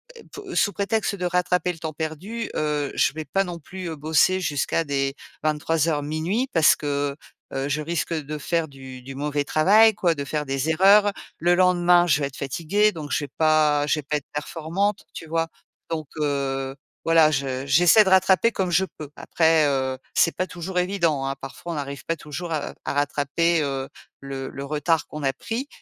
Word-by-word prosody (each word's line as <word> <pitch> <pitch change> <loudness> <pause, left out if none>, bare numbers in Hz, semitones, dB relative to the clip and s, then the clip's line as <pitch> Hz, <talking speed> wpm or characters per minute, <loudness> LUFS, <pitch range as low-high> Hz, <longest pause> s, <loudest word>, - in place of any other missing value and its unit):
é 460 - -13
po 415 - -8
heu, - - -6
sous 205 - +3
prétexte 210 +1 -1
de 180 -2 -4
rattraper 180 0 +1
le 165 - -14
temps 160 -1 -5
perdu, 165 +9 -5
heu, 150 -2 -1
je - - +2
vais 155 0 -6
pas 195 +4 +1
non 175 -1 -6
plus, 180 +2 -7
heu, 160 - -5
bosser 160 +5 +2
jusqu'à 150 0 0
des 135 -2 -1 0.3
23:00-00:00, 155 - 0
parce 165 -3 +6
que, 145 -1 -2 0.4
heu, 135 +1 -2
je 150 +2 -1
risque, 170 +2 -2
heu, 155 - -2
de 150 +2 -5
faire 165 +2 -1
du 130 -2 -11
du 135 +2 -9
mauvais 145 +1 -1
travail, 215 +8 +5
quoi, 170 -3 +2
de 140 - -4
faire 150 +1 -2
des 135 +3 -2
erreurs. 200 +5 +5 0.3
Le 175 +2 +3
lendemain, 175 -1 +4
je 150 -3 +3
vais 140 - 0
être 140 - -12
fatiguée, 170 +10 +1
donc 155 -6 -8
je - - 0
vais - - -15
pas 155 -2 +3
je 150 - +1
vais - - -6
pas 150 +2 -1
être 140 - -10
performante, 170 +7 -2
tu 165 - -8
vois? 165 +1 0 0.4
Donc, 155 -3 -3
heu, 135 -2 -1 0.3
voilà, 165 -2 +5
je 135 -1 -2
j'essaie 175 - +6
de 190 - 0
rattraper 190 +4 +4
comme 185 -4 -2
je 180 +3 +3
peux. 150 -2 -8
Après, 160 -2 +2
heu, 130 -2 -1 0.2
c'est 165 - +3
pas 185 - -1
toujours 180 +1 -3
évident, 170 -7 0
hein. 135 - -2
Parfois, 140 +5 -7
on - - -5
n'arrive 140 -1 -5
pas 165 - -1
toujours, 160 +3 -6
heu, 150 -2 -3
à - - -2
rattraper, 145 +4 +1
heu 135 -1 -3 0.3
le 135 -1 -6
le 140 - -7
retard 155 +2 0
qu'on 150 -1 -7
a 135 - +1
pris. 230 - -4
155 Hz, 200 wpm, -24 LUFS, 145-175 Hz, 0.4 s, parce